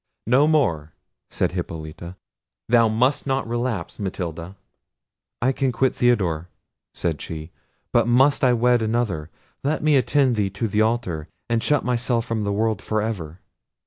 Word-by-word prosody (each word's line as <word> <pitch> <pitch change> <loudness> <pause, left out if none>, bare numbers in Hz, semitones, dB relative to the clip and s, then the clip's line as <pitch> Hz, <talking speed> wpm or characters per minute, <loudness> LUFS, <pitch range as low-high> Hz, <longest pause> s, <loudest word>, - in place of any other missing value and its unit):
"No 130 +6 +4
more," 85 - +1 0.4
said - - 0
Hippolita; 80 +2 -6 0.5
"thou 115 -1 +5
must 125 +6 +1
not 135 -2 0
relapse, 120 -6 -3
Matilda." 90 -2 -5 0.9
"I 130 - +4
can 135 0 0
quit 130 +2 +1
Theodore," 90 -10 +1 0.4
said 85 -3 -3
she, 80 0 -7 0.4
"but 120 -1 +3
must 135 +5 +4
I 125 -1 +5
wed 120 0 +3
another? 110 -9 -1 0.3
let 150 +3 -1
me 155 -1 +4
attend 130 -1 +2
thee 100 -2 +1
to 105 +4 -3
the 105 +1 +1
altar, 100 -9 -1 0.2
and 115 -1 +2
shut 145 +2 +1
myself 120 -1 0
from 110 -2 -2
the 100 - -1
world 110 +2 0
for 110 - -1
ever." 95 -6 -4
115 Hz, 150 wpm, -23 LUFS, 90-125 Hz, 0.9 s, thou